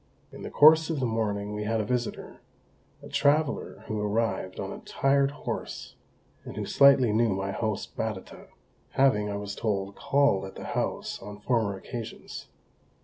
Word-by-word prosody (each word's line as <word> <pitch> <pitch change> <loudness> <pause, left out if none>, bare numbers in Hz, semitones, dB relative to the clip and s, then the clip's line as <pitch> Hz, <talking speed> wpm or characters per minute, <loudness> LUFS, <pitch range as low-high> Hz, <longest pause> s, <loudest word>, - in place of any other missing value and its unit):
In - - -11
the - - -5
course 160 +2 +6
of 160 -3 -1
the 130 - 0
morning 105 -3 -1
we 105 0 -3
had 110 +1 0
a 105 - -1
visitor; 120 +1 -3 0.6
a - - -9
traveller 145 +1 +1
who 110 -1 -3
arrived 105 -3 -1
on - - -4
a - - -8
tired 135 0 +2
horse, 145 - -6 0.5
and - - -9
who - - -2
slightly 135 -5 +5
knew 115 +1 +3
my 95 0 -2
host 110 +1 -3
Batata, 110 -4 -5 0.5
having, 105 -6 +3
I 100 - -3
was 100 0 -5
told, 100 -3 -2
called 140 -9 +2
at 95 - -10
the - - -8
house - - -3
on 105 +1 -8
former 105 -3 0
occasions. 115 +3 -8
110 Hz, 165 wpm, -27 LUFS, 100-135 Hz, 0.6 s, course